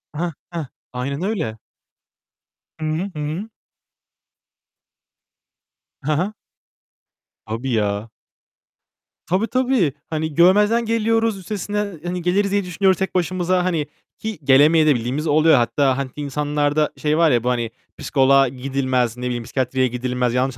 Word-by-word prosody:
Heh 170 Hz, +2 st, -2 dB, 0.2 s
heh. 165 Hz, -4 st, -3 dB, 0.3 s
Aynen 140 Hz, +5 st, -3 dB
öyle. 160 Hz, -, -2 dB, 1.2 s
Hı 155 Hz, -, -3 dB
hı. 165 Hz, +6 st, -2 dB
Hı -, -, -5 dB
hı. 160 Hz, +9 st, -4 dB, 2.6 s
He 155 Hz, -, +1 dB
he. 185 Hz, +7 st, 0 dB, 1.1 s
Tabii 115 Hz, +4 st, -3 dB
ya. 105 Hz, +1 st, -1 dB, 1.1 s
Tabii 190 Hz, +6 st, 0 dB
tabii. 250 Hz, -, +1 dB, 0.2 s
Hani, 155 Hz, -1 st, -2 dB
görmezden 210 Hz, +7 st, +4 dB
geliyoruz. 225 Hz, -1 st, +1 dB
Üstesinden, 205 Hz, -1 st, -4 dB
hani, 175 Hz, 0 st, -3 dB
geliriz 195 Hz, +3 st, +1 dB
diye 200 Hz, -1 st, +1 dB
düşünüyoruz 185 Hz, +1 st, +2 dB
tek 190 Hz, -1 st, -3 dB
başımıza. 180 Hz, 0 st, +1 dB
Hani 160 Hz, -5 st, 0 dB, 0.3 s
ki 220 Hz, -7 st, -5 dB
gelemeye 150 Hz, +4 st, +5 dB
de 150 Hz, -3 st, +4 dB
bildiğimiz 130 Hz, +7 st, -2 dB
oluyor. 155 Hz, +1 st, +5 dB
Hatta 130 Hz, +2 st, +2 dB
hani 135 Hz, -1 st, -3 dB
insanlarda 145 Hz, +1 st, 0 dB
şey 150 Hz, +1 st, 0 dB
var 165 Hz, -3 st, +4 dB
ya 120 Hz, -1 st, +2 dB
bu 125 Hz, -, +1 dB
hani 120 Hz, -2 st, -1 dB, 0.3 s
psikoloğa 135 Hz, -1 st, +3 dB
gidilmez. 130 Hz, -2 st, -1 dB
Ne 125 Hz, -, -5 dB
bileyim 120 Hz, -1 st, -2 dB
psikiyatriye 130 Hz, +1 st, 0 dB
gidilmez. 125 Hz, 0 st, -1 dB
Yanlış 130 Hz, 0 st, 0 dB
150 Hz, 130 wpm, -21 LUFS, 130-185 Hz, 2.6 s, gelemeye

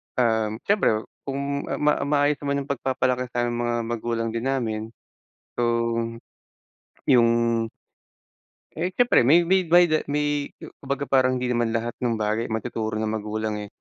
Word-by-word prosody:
um, 110 Hz, -2 st, +1 dB
siyempre 195 Hz, -, +2 dB, 0.2 s
kung 140 Hz, +1 st, -3 dB
ah, -, -, -4 dB
ma 150 Hz, 0 st, +4 dB
maayos 145 Hz, 0 st, +2 dB
naman 140 Hz, -1 st, -1 dB
yung 140 Hz, -, -17 dB
pagpapalaki 130 Hz, -2 st, 0 dB
sa 120 Hz, 0 st, 0 dB
mga 120 Hz, 0 st, -1 dB
magulang 115 Hz, 0 st, -2 dB
din 115 Hz, +2 st, -4 dB
namin, 115 Hz, -5 st, -1 dB, 0.8 s
so, -, -, +2 dB, 1.4 s
yung 120 Hz, -2 st, +5 dB, 1.5 s
Eh, 170 Hz, +3 st, -1 dB
siyempre 245 Hz, 0 st, +4 dB
may 170 Hz, +5 st, +6 dB
may 185 Hz, 0 st, +2 dB
da 170 Hz, -2 st, +5 dB
may 145 Hz, 0 st, 0 dB
ku -, -, -11 dB
kumbaga 140 Hz, 0 st, -3 dB
parang 130 Hz, -2 st, +3 dB
hindi 125 Hz, 0 st, -1 dB
naman 120 Hz, -1 st, 0 dB
lahat 115 Hz, +1 st, -1 dB
ng 120 Hz, -2 st, 0 dB
bagay 110 Hz, +1 st, -1 dB
matuturo 110 Hz, -1 st, -3 dB
ng 110 Hz, -, -1 dB, 0.2 s
magulang, 110 Hz, 0 st, -3 dB
eh. 105 Hz, -, -6 dB
125 Hz, 150 wpm, -24 LUFS, 115-140 Hz, 1.5 s, may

